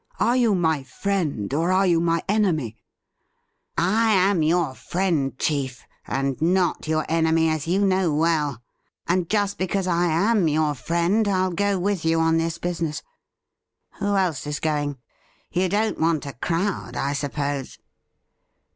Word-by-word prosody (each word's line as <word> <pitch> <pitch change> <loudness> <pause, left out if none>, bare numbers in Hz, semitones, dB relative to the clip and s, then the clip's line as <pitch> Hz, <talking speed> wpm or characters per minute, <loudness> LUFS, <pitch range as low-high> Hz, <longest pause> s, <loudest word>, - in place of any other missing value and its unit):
Are 240 - +2
you 235 -5 +3
my 160 -5 +1
friend, 140 - -2
or 165 +5 +1
are 190 +1 +3
you 170 -3 +3
my 165 -1 +1
enemy 175 - +1 0.4
?' - - -48
' - - -49
I 220 +6 +2
am 190 -2 +3
your 160 -2 +1
friend, 160 -5 -1
chief, 135 -4 -2 0.2
and 135 0 -2
not 175 0 +1
your 155 0 0
enemy, 160 0 +2
as 155 -1 -2
you 195 +4 +2
know 185 -3 +2
well; 150 -5 0 0.4
and 175 -1 0
just 205 -2 0
because 185 +1 -1
I 175 -1 +1
am 190 +3 +2
yoiu 155 -1 +1
friend 170 - +1
I'll 185 -2 +1
go 200 +2 +1
with 190 -1 -1
you 165 0 +2
on 165 0 +3
this 165 0 -1
business. 165 -3 -3 1.0
Who 200 0 0
else 175 -7 0
is 150 -1 -3
going? 145 -2 -1 0.5
You 185 +1 +1
don't 215 +3 0
want 160 -2 +1
a 140 - -6
crowd, 175 - -2
I 140 +1 -1
suppose 140 -1 -3
165 Hz, 155 wpm, -23 LUFS, 150-190 Hz, 1.0 s, you